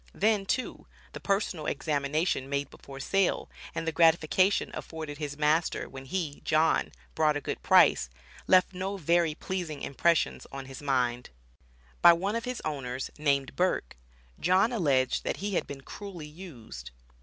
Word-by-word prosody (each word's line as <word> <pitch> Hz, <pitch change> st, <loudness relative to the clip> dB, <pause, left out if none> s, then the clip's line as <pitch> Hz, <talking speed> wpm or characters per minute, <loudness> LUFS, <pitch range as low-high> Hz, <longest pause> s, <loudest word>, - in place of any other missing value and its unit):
Then, 210 Hz, -1 st, +2 dB
too, 255 Hz, -, -2 dB, 0.3 s
the -, -, -6 dB
personal 195 Hz, -6 st, -1 dB
examination 145 Hz, 0 st, -1 dB
made 140 Hz, 0 st, -2 dB
before 135 Hz, -1 st, -11 dB
sale, 195 Hz, +7 st, 0 dB, 0.2 s
and 165 Hz, -, -3 dB
the -, -, +2 dB
gratification 165 Hz, +3 st, +3 dB
afforded 155 Hz, -3 st, -7 dB
his 145 Hz, -2 st, -4 dB
master 155 Hz, +2 st, +1 dB
when 135 Hz, 0 st, -10 dB
he 155 Hz, -1 st, -3 dB
(John), 155 Hz, +1 st, +2 dB, 0.2 s
brought 155 Hz, -2 st, +2 dB
a -, -, -2 dB
good -, -, -5 dB
price 65 Hz, -, +5 dB, 0.4 s
left 185 Hz, 0 st, +5 dB
no 190 Hz, +2 st, -3 dB
very 170 Hz, -2 st, +2 dB
pleasing 170 Hz, -5 st, -4 dB
impressions 165 Hz, +4 st, +1 dB
on 135 Hz, -1 st, -6 dB
his 135 Hz, +1 st, -9 dB
mind. 125 Hz, -3 st, 0 dB, 0.7 s
By 170 Hz, -, +9 dB
one 195 Hz, +6 st, -1 dB
of 230 Hz, +1 st, -2 dB
his 250 Hz, -1 st, -4 dB
owners, 135 Hz, -4 st, -4 dB
named 140 Hz, -3 st, +1 dB
Burke, 180 Hz, -, 0 dB, 0.4 s
John 185 Hz, +6 st, +3 dB
alleged 140 Hz, -, +1 dB
that -, -, -2 dB
he 200 Hz, +1 st, -3 dB
had -, -, 0 dB
been 140 Hz, -1 st, -8 dB
"cruelly 185 Hz, +1 st, -8 dB
used." 150 Hz, -, -10 dB
155 Hz, 155 wpm, -29 LUFS, 140-185 Hz, 0.7 s, By